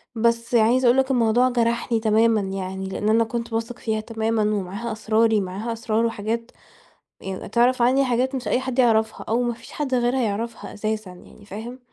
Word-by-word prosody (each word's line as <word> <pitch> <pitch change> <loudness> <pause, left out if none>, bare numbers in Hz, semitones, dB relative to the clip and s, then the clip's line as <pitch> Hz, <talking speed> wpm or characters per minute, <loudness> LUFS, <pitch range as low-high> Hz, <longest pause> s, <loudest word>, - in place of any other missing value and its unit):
بس 230 +1 +1
عايزة 235 +3 +4
أقول 240 +2 +5
لك 265 0 +2
الموضوع 245 0 +3
جرحني 235 -1 0
تمامًا 220 0 +3
يعني، 190 0 -4
لأن 210 +2 -2
أنا 225 +1 +4
كنت 230 +1 -4
باثق 230 +2 -3
فيها 220 -1 -1
تمامًا 225 0 -1
ومعاها 210 +2 -2
أسراري، 220 0 +2
معاها 200 +5 -4
أسرار 225 0 0
وحاجات 230 +1 -3 0.7
يعني 190 -1 -6
تعرف 240 +3 +2
عني 260 +3 +4
حاجات 255 +1 0
مش 260 -1 -3
أي 250 - +2
حد 260 -1 -4
يعرفها 220 -3 +2
أو 235 +3 +1
ما 240 -1 -1
فيش - - -14
حد 280 -3 -2
غيرها 245 +1 +1
يعرفها 225 +1 -4
أساسًا 215 -1 -3
يعني، 180 +3 -15
فاهم؟ 220 +5 -8
230 Hz, 180 wpm, -23 LUFS, 215-240 Hz, 0.7 s, أقول